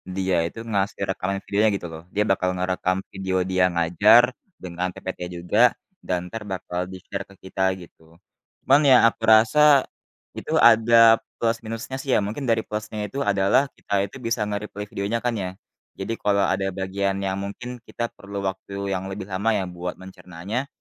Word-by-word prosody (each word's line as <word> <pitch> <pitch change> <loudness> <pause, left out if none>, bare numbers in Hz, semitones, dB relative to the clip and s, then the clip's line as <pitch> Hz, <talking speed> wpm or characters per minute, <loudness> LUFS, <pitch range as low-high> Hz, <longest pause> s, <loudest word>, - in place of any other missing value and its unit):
dia 95 -1 0
itu 85 - -9
ngasih 100 0 -1
rekaman 95 +1 -2
videonya 105 +2 +2
gitu 90 - -5
loh. 80 0 -9
Dia 105 - +3
bakal 95 -1 +1
ngerekam 90 0 -1
video 95 -1 -3
dia 95 0 +2
ngajar 85 +8 +5 0.4
dengan 90 0 -3
PPT 95 - -7 0.2
juga 110 +8 +4 0.3
dan 90 - -1
entar 115 +3 -7
bakal 90 -1 -4
di 95 - -7
share 100 -1 -4
ke 100 - -16
kita 95 - -5 0.2
gitu. 80 -1 -17 0.4
Cuman 140 +3 +4
ya - - +9
aku 115 - -3
rasa 110 +7 +4 0.8
itu - - -6
ada 115 0 +7 0.2
plus-minusnya 115 +2 -2
sih 135 - -9
ya. - - +4
Mungkin 110 +8 -5
dari 115 -1 +3
plus-nya 105 0 -5
itu 135 - -8
adalah 100 +5 +3
kita - - -8
itu 100 - -7
bisa 115 0 0
nge-replay 105 0 -5
videonya 100 +4 -2
kan 120 - +2
ya. 90 - -3 0.5
Jadi 95 +4 -3
kalau 100 -1 +2
ada 95 0 0
bagian 95 +1 -1
yang 95 0 -2
mungkin 120 +5 -6
kita 120 0 -4
perlu 100 0 -6
waktu 100 +1 -4
yang 95 0 -2
lebih 95 +1 -5
lama 100 +4 0
ya 100 - 0
buat 90 -1 -5
mencernanya, 95 +6 -6
100 Hz, 175 wpm, -23 LUFS, 95-110 Hz, 0.8 s, ya